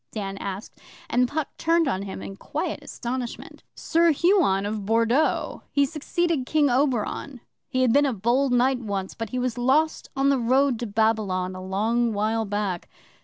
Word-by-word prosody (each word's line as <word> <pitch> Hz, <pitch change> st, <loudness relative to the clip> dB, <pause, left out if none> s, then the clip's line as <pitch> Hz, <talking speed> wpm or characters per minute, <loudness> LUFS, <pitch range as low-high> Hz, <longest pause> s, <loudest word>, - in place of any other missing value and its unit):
Dan 195 Hz, -3 st, -4 dB
asked, 195 Hz, +2 st, -6 dB, 0.3 s
and 250 Hz, 0 st, +3 dB
Puck 305 Hz, +2 st, -3 dB
turned 330 Hz, -1 st, +2 dB
on 195 Hz, -8 st, -1 dB
him 195 Hz, -1 st, -6 dB
in 195 Hz, -, -7 dB
quiet -, -, -4 dB
astonishment. 245 Hz, 0 st, -6 dB
'Sir 335 Hz, +1 st, +2 dB
Huon 315 Hz, -, +3 dB
of 210 Hz, 0 st, -3 dB
Bordeaux 230 Hz, +7 st, +1 dB
he 280 Hz, -1 st, +3 dB
succeeded 310 Hz, -1 st, -1 dB
King 295 Hz, -3 st, +3 dB
Oberon. 260 Hz, 0 st, 0 dB, 0.3 s
He 255 Hz, -1 st, +1 dB
had 240 Hz, -3 st, +3 dB
been 285 Hz, 0 st, +4 dB
a -, -, +1 dB
bold 245 Hz, +5 st, +1 dB
knight 250 Hz, +1 st, +3 dB
once, 200 Hz, -5 st, -4 dB
but 225 Hz, -2 st, -5 dB
he 255 Hz, -, -4 dB
was 250 Hz, -1 st, -2 dB
lost 290 Hz, +6 st, +1 dB
on 270 Hz, +1 st, +2 dB
the 275 Hz, -2 st, +2 dB
road 255 Hz, +1 st, +2 dB
to 240 Hz, -, -3 dB
Babylon, 205 Hz, -4 st, 0 dB
a 185 Hz, -, -7 dB
long 220 Hz, +5 st, 0 dB
while 220 Hz, +2 st, 0 dB
back. 200 Hz, -3 st, -3 dB
240 Hz, 170 wpm, -25 LUFS, 210-275 Hz, 0.3 s, been